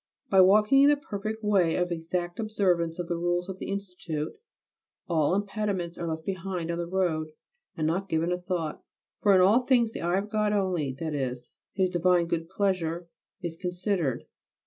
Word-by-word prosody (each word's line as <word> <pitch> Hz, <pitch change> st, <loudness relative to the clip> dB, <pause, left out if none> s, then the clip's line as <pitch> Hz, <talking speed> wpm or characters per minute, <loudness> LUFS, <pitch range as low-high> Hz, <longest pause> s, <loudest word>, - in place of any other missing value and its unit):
By 190 Hz, -1 st, +7 dB
walking 210 Hz, +8 st, +6 dB
in 285 Hz, -, +7 dB
the 295 Hz, -, +4 dB
perfect 220 Hz, -4 st, -5 dB
way 190 Hz, -6 st, +3 dB
of 180 Hz, 0 st, 0 dB
exact 175 Hz, +2 st, -3 dB
observance 185 Hz, -6 st, +1 dB
of 175 Hz, -1 st, -4 dB
the 170 Hz, -, -1 dB
rules 175 Hz, +1 st, 0 dB
of 190 Hz, -1 st, -6 dB
the -, -, -5 dB
Institute, 180 Hz, -6 st, -4 dB, 0.7 s
all 165 Hz, 0 st, +2 dB
impediments 200 Hz, -4 st, -2 dB
are 170 Hz, -, -4 dB
left 160 Hz, 0 st, -4 dB
behind 185 Hz, -3 st, -3 dB
on 170 Hz, -, -3 dB
the 170 Hz, -, -2 dB
road 165 Hz, -4 st, -1 dB, 0.4 s
and 155 Hz, -, 0 dB
not 185 Hz, +5 st, -1 dB
given 160 Hz, +2 st, +1 dB
a 180 Hz, -, 0 dB
thought; 175 Hz, -4 st, -3 dB, 0.4 s
for 200 Hz, -2 st, +5 dB
in 185 Hz, -, +6 dB
all 200 Hz, +6 st, +6 dB
things 245 Hz, -3 st, +2 dB
the -, -, -6 dB
eye 175 Hz, +2 st, +1 dB
of 205 Hz, +2 st, -3 dB
God 210 Hz, -1 st, +1 dB
only, 185 Hz, -8 st, 0 dB
that 160 Hz, 0 st, -3 dB
is, 125 Hz, -3 st, -4 dB, 0.2 s
His 190 Hz, -1 st, +3 dB
divine 180 Hz, -1 st, +2 dB
good 165 Hz, 0 st, -2 dB
pleasure, 175 Hz, -4 st, -1 dB, 0.3 s
is 170 Hz, -2 st, -3 dB
considered. 180 Hz, -, -1 dB
180 Hz, 185 wpm, -28 LUFS, 165-200 Hz, 0.7 s, By